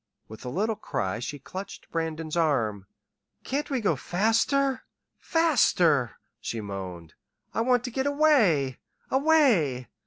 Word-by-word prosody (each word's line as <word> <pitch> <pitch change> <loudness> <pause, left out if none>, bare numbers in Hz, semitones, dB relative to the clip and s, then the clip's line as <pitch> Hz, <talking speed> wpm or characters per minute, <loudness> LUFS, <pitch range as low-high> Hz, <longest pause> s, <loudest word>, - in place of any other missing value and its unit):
With 110 0 -11
a 125 - -5
little 215 - -1
cry 95 - -3
she 140 +4 -5
clutched 185 +8 -9
Brandon's 160 -1 -3
arm. 115 - 0 0.6
"Can't 285 +3 -2
we 265 -4 -1
go 200 -7 +2
faster 225 - +1 0.4
faster," 180 - +2 0.2
she 115 - -4
moaned. 95 -5 -7 0.4
"I - - 0
want 245 0 +2
to 245 - -4
get 265 +3 -1
away 230 - +3 0.3
away!" 250 - +3
175 Hz, 125 wpm, -27 LUFS, -, 0.6 s, away